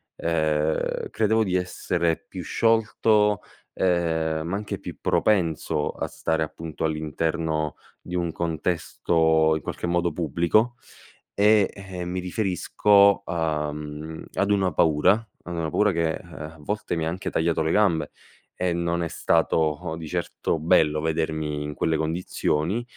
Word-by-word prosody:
ehm, 80 -2 0
credevo 110 +1 +2
di 90 -3 -1
essere 85 -2 -1
più - - -6
sciolto, 110 -2 +2 0.3
ehm, 80 -3 0
ma 90 - -2
anche 105 +1 -4
più - - -8
propenso 80 -6 +1
a - - -3
stare 80 -1 -1
appunto, 80 0 -6
all'interno 80 0 -1 0.2
di 90 - -10
un 85 -2 0
contesto 80 -1 +1
in 80 - -4
qualche - - -4
modo 85 -1 +1
pubblico, 85 - +1 0.6
e, 105 -1 +5
ehm, 90 -3 -7
mi 90 0 -2
riferisco, 100 +2 +3
uhm, 75 -1 -3
ad 100 - 0
una 95 -4 +2
paura 90 +9 +3 0.2
ad 85 - -4
una 80 -1 -1
paura 105 +5 +3
che, 85 -1 0
eh, - - -7
a 80 +1 -9
volte 100 +2 -3
mi 80 - -1
ha 80 - 0
anche 90 +3 -4
tagliato 80 0 +1
le 80 0 +1
gambe, 85 -8 +2 0.5
e 90 -1 0
non 85 0 -1
è - - -1
stato 80 -2 +1
di 80 -1 -7
certo 80 - -2
bello 75 -2 +3
vedermi 80 -2 -1
in 75 0 -5
quelle 80 +1 +1
condizioni, 85 +4 -1
85 Hz, 140 wpm, -25 LUFS, 80-95 Hz, 0.6 s, e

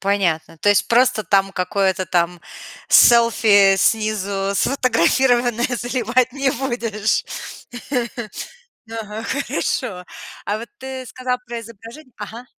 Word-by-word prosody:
Понятно. 170 -5 -1
То 205 - +1
есть 205 - +3
просто 245 -2 +3
там 195 -1 +2
какое-то 190 +1 0
там 175 0 0 0.5
селфи, 220 -4 +6
снизу 200 -2 0
сфотографированное, 245 0 +2
заливать 245 +1 0
не 275 -1 0
будешь? 230 -5 -1 1.7
Ага, 220 -1 -6
хорошо. 180 -7 -3 0.4
А 205 +1 -2
вот 230 +2 -8
ты 265 -1 -7
сказал 250 +1 -3
про 235 -1 -5
изображень 230 +5 -13
Ага. 225 +4 -8
225 Hz, 105 wpm, -20 LUFS, 195-245 Hz, 1.7 s, селфи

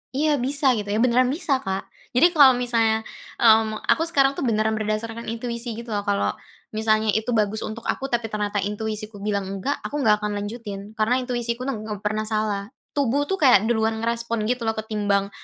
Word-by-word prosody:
"Iya, 295 -1 +2
bisa" 275 +1 +2
gitu 210 -2 -4
ya, 215 - +1
beneran 250 +1 +4
bisa, 285 -4 0
Kak. 190 0 -3 0.3
Jadi 340 +7 +5
kalau 270 -6 +7
misalnya, 225 -2 +1 0.3
mmm, 220 -1 +4
aku 325 - +3
sekarang 275 -4 +3
tuh - - -2
beneran 220 -3 +1
berdasarkan 220 +2 -3
intuisi 235 0 -4
gitu 235 -1 -6
loh, 205 - 0
kalau 200 0 +1 0.4
misalnya 215 0 +2
itu 220 +3 -1
bagus 215 0 +1
untuk 225 +2 -6
aku, 270 - -2
tapi 235 -1 0
ternyata 210 -1 -2
intuisiku 215 0 -4
bilang 200 -1 -1
enggak, 195 +9 -3
aku 295 - -3
nggak 210 -3 +4
akan 210 - -1
lanjutin, 210 -1 -7
karena 245 +4 +2
intuisiku 245 0 -2
nem 250 - -2
nggak 210 -2 -5
pernah 215 +1 -1
salah. 215 -1 -2 0.3
Tubuh 285 +2 +1
tuh 385 - 0
kayak 245 - +5
duluan 220 -1 +1
merespon 230 -1 -1
gitu 250 -1 -1
ketimbang 210 -3 0
220 Hz, 185 wpm, -23 LUFS, 215-245 Hz, 0.4 s, kalau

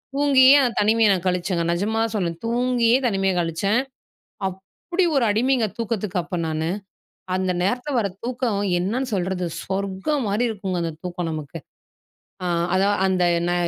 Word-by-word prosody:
தூங்கியே 275 -2 +6
அந்த 250 -3 +2
தனிமைய 220 +1 +4
நான் 190 -2 0
கழிச்சேங்க 180 -1 0
நிஜமா 205 +6 -1
தான் 225 - -2
சொல்றேன். 170 -5 -1
தூங்கியே 240 0 +2
தனிமைய 195 -3 +1
கழிச்சேன். 175 +7 +1 0.7
அப்படி 195 - -3
ஒரு 265 - +3
அடிமைங்க 240 +2 +2
தூக்கத்துக்கு 210 -5 -2
அப்போ 175 +2 -5
நானு. 160 +1 -2 0.7
அந்த 185 -1 0
நேரத்தில 245 +9 -1
வர்ற 200 -4 0
தூக்கம் 240 -4 -1 0.2
என்னன்னு 235 +8 -1
சொல்றது, 185 -1 -1 0.2
சொர்க்கம் 195 +8 -2
மாரி 210 +5 +1
இருக்குங்க. 190 -4 -3
அந்த 165 -1 -2
தூக்கம் 175 -1 -3
நமக்கு. 155 +1 -6 1.2
அதான் 200 +2 +2
அந்த 185 -1 +2 0.2
நா 175 - +1
200 Hz, 140 wpm, -23 LUFS, 180-235 Hz, 1.2 s, தூங்கியே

